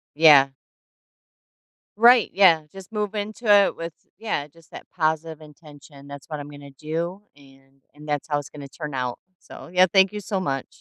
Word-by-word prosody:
Yeah. 145 -4 +7 1.5
Right, 240 0 +6
yeah, 180 -5 +5
just 195 +1 -13
move 210 -1 -3
into 215 +3 -5
it 200 -1 +5
with 165 -1 -7 0.3
yeah, 210 -10 -3
just 160 +2 -23
that - - -11
positive 160 -1 -2
intention. 145 -2 -16
That's 140 -1 -11
what 150 - -5
I'm 145 - -8
gonna 145 -1 -12
do, 165 +8 -5
and 135 -1 -22
and 150 +1 -14
that's 145 0 -3
how 145 -1 0
it's 145 - -7
gonna 145 -2 -10
turn 150 0 -8
out, 125 -2 -3 0.2
so - - -13
yeah, 185 +1 +5
thank 190 +1 +4
you 210 - -4
so 200 -1 -3
much. 135 -7 -3
155 Hz, 180 wpm, -23 LUFS, 145-190 Hz, 1.5 s, Yeah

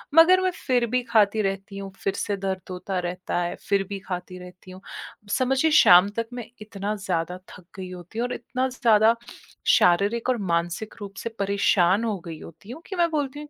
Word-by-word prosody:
मगर 365 +3 +7
मैं 370 0 +1 0.2
फिर 245 -2 +3
भी 250 - +3
खाती 215 -1 +3
रहती 195 0 -3
हूँ। 195 -1 -7
फिर 195 - -2
से 200 -1 -2
दर्द 190 -1 -2
होता 185 +1 -3
रहता 180 0 -3
है, 175 0 -2
फिर 200 -1 +3
भी 200 -1 -4
खाती 180 -1 -6
रहती 180 +1 -13
हूँ। 185 +1 -12 0.6
समझिए, 270 +5 +2
शाम 180 +3 +7
तक 230 - -2
मैं 245 -2 -6 0.2
इतना 205 0 -4
ज़्यादा 180 -2 -3
थक 180 - -13
गई 185 -1 -6
होती 180 +5 -8
हूँ 245 - 0
और 250 - -4
इतना 255 +2 -2
ज़्यादा 230 -2 +4 0.6
शारीरिक 200 +7 +2
और 250 - +2 0.2
मानसिक 175 +5 -2
रूप 200 -1 -8
से - - -2
परेशान 200 0 +2
हो 215 -4 -1
गई 165 -2 -7
होती 195 +7 -12
हूँ 315 +6 -9
कि 385 - -5
मैं 345 -1 +2
बोलती 290 -1 -2
हूँ, 300 0 -9
200 Hz, 200 wpm, -24 LUFS, 185-240 Hz, 0.6 s, मगर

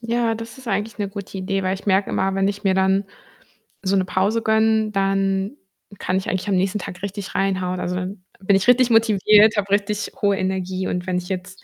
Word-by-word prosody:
Ja, 235 -1 0
das 225 0 -8
ist 260 - -14
eigentlich 210 +2 -2
'ne 205 - -2
gute 200 0 -8
Idee, 195 +1 -2
weil 185 0 0
ich 195 - -10
merke 195 0 +2
immer, 190 0 0
wenn 195 0 +1
ich 205 +1 -5
mir 190 -1 +3
dann 190 +1 +2 0.8
so 195 0 +1
'ne 190 -1 +2
Pause 200 +5 0
gönne, 220 0 +2
dann 195 +3 0 0.4
kann 185 - -1
ich 190 - -3
eigentlich 190 +2 -2
am 200 - +1
nächsten 190 +3 0
Tag 180 -1 -8
richtig 200 -1 -6
reinhauen. 185 -2 0
Also, 180 0 -2
dann 185 +1 -5 0.2
bin 195 0 +2
ich 195 +3 +1
richtig 250 0 +5
motiviert, 215 -1 +5
habe 200 -1 -1
richtig 205 +1 0
hohe 200 -1 +2
Energie. 185 0 -2
Und 180 0 -3
wenn 185 -1 -1
ich 180 0 -5
jetzt 185 -1 -6
195 Hz, 215 wpm, -21 LUFS, 190-210 Hz, 0.8 s, richtig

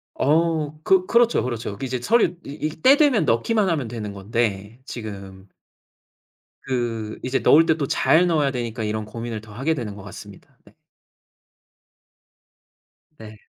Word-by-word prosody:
어 155 0 +1
그 190 0 +3
그렇죠, 235 0 +3
그렇죠. 115 -5 -4
이제 130 -1 -3
서류 210 - +2
이 150 +2 -4
이 155 - -16
때 275 - +6
되면 275 - +3
넣기만 195 - +1
하면 150 -8 -1
되는 110 -3 -6
건데. 105 +2 -3
지금 100 -5 -8 1.1
그 115 -4 -3
이제 130 +1 0
넣을 160 +3 +5
때 160 - +2
또 140 -3 -2
잘 175 +6 +3
넣어야 150 -5 +1
되니까 120 -2 -4
이런 110 0 -3
고민을 115 0 -6
더 110 -1 -14
하게 135 +8 0
되는 115 -9 -5
것 100 - -11
같습니다. 100 0 -12
네. - - -20 2.4
네. 110 -1 -11
125 Hz, 260 characters per minute, -22 LUFS, 110-160 Hz, 2.4 s, 때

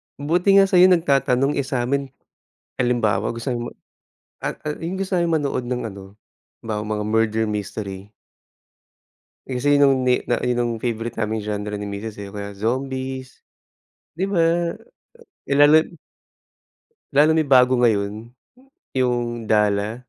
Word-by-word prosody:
Buti 175 +7 +2
nga 195 0 +7
sa'yo 180 0 +7
nagtatanong, 140 -5 +2
eh 135 - -2
sa'min 135 +2 -1 0.7
halimbawa 115 -5 +1
gusto 115 +2 -6 1.0
at, - - -3
ah, 150 - -2
yung 180 +3 -3
gusto 195 -1 -1
naming 165 -2 +1
manood 135 -3 -2
ng 125 0 -2
ano, 100 -1 -10 0.6
'bawa 105 -2 -3
mga 105 0 -2
murder 110 0 +1
mystery. 100 -1 -5 1.3
Eh 130 - -6
kasi 145 +2 +3
yung 135 -2 +4
ni 125 - +2
na 120 - 0
yun 125 0 0
yung 120 -1 0
favorite 115 -1 -3
naming 110 -1 -2
genre 105 0 -3
ni 105 - -5
misis 100 +2 -6
eh, 100 -1 -8
mga 100 -1 -7
zombies, 130 +3 -4 0.7
di 190 - 0
ba? 195 -4 +1 1.0
Eh 140 - -1
lalo 145 +2 +7 1.3
lalo 150 +2 +5
na 160 - +3
yung 140 -3 -6
bago 125 0 +6
ngayon, 105 -4 +2 0.8
yung 120 -2 -1
Dala? 105 0 +1
120 Hz, 135 wpm, -22 LUFS, 105-140 Hz, 1.3 s, nga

